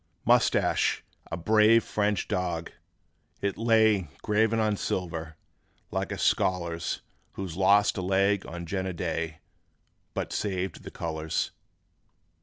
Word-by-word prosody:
('Moustache, - - +3 0.3
a 85 - -2
brave 110 +5 +5
French 105 -2 0
dog,' 85 -2 -2 0.7
it 100 -1 -1
lay 110 -5 +3 0.2
Graven 110 +2 +2
on 110 -1 +2
silver, 80 -4 -3 0.5
like - - -2
a - - -3
scholar's; 85 -3 0 0.3
'Who 95 - -4
lost 95 +4 +3
a - - -1
leg 100 +2 +2
on 85 0 -6
Jena 95 +1 -2
day, 80 -1 -3 0.7
But - - -3
saved 95 -2 -2
the - - -8
colors! 80 -1 -2
95 Hz, 115 wpm, -28 LUFS, 85-105 Hz, 0.7 s, brave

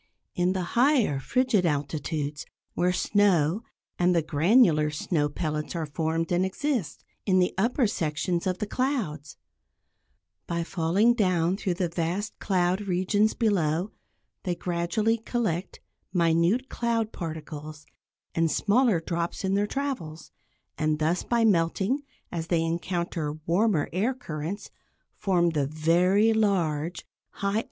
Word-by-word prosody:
In 180 +1 +1
the 185 -1 -1
higher, 245 - +3
frigid 250 - +1
altitudes 150 -1 -2 0.3
where 180 +1 +1
snow, 185 -2 +2 0.4
and 180 0 +3
the 165 - +2
granular 160 - +4
snow 150 0 -1
pellets 150 +1 -3
are 165 -2 -1
formed 160 +2 -2
and 175 +1 +2
exist, 225 - -2 0.2
in 185 -1 +4
the 180 -1 +2
upper 235 +6 +2
sections 170 -1 -1
of 185 -1 0
the 210 - -2
clouds; 205 - -2 1.1
by 170 0 -1
falling 185 +7 +2
down 185 -5 +1
through 195 -3 -2
the 180 0 0
vast 175 +5 -3
cloud 185 0 +1
regions 195 +4 +2
below, 185 -4 +1 0.5
they 180 -3 -2
gradually 185 +7 0
collect 215 -6 -2 0.3
minute 170 +8 +2
cloud 230 -3 -1
particles, 155 -2 -7 0.5
and 165 0 +2
smaller 220 +1 +3
drops 170 +2 -3
in 190 0 0
their 205 +1 +2
travels, 210 - -4 0.5
and 155 0 +1
thus, 160 +3 +1
by 235 -1 +1
melting, 195 - +2 0.3
as 165 -1 -4
they 170 -2 +1
encounter 170 -2 -2
warmer 175 -2 +2
air 220 +9 +1
currents, 170 - -6 0.4
form 175 -4 +2
the 145 -4 0
very 180 +8 +3
large, 175 -7 0
high - - -48
altitude 200 0 -5
raindrops. 215 - +2
180 Hz, 130 wpm, -27 LUFS, 160-205 Hz, 1.1 s, granular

